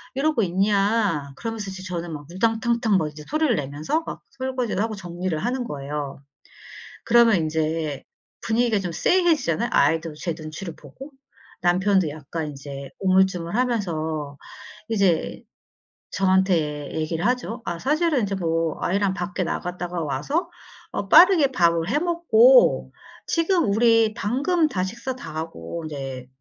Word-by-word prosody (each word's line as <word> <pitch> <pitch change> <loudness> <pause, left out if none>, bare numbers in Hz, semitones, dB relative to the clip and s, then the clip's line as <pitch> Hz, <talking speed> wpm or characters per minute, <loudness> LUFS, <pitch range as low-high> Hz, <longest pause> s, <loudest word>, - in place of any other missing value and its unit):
이러고 280 -4 +1
있냐?" 195 -5 +1
그러면서 225 -2 -5
이제 190 0 -8
저는 175 -3 -5
막 145 -1 -7
우당탕탕 225 +1 +1
막 155 -4 -1
이제 150 0 -11
소리를 310 -4 +1
내면서 150 - -2
막 - - -7
설거지도 255 -6 -2
하고 220 -1 -2
정리를 175 -2 -4
하는 245 +8 -2
거예요. 145 -2 -5 0.9
그러면 230 -2 +5
인제 155 -2 -2 0.4
분위기가 225 -1 +1
좀 180 -3 -4
쎄해지잖아요. 285 - +2
아이도 160 +2 +2
제 165 +1 -3
눈치를 155 +2 -7
보고 270 - -12 0.5
남편도 185 -1 +2
약간 155 +1 -5
인제 140 -1 -8
우물쭈물하면서 180 - 0 0.5
이제 195 -6 +1 0.7
저한테 180 -6 +1
얘기를 160 +1 -2
하죠. 245 -1 -2
"아 170 - -3
사실은 300 - +1
이제 200 -1 -2
뭐 165 -3 -1
아이랑 195 +1 +1
밖에 180 0 -3
나갔다가 175 0 -3
와서 215 - -2 0.5
어 - - -3
빠르게 345 -7 +7
밥을 170 -5 +2
해 290 - +1
먹고 440 +9 +4 0.4
지금 330 - +1
우리 225 0 +4
방금 300 - +1
다 185 -9 -1
식사 235 +7 -4
다하고 160 - -6
이제 135 -4 -6
190 Hz, 300 characters per minute, -23 LUFS, 160-235 Hz, 0.9 s, 빠르게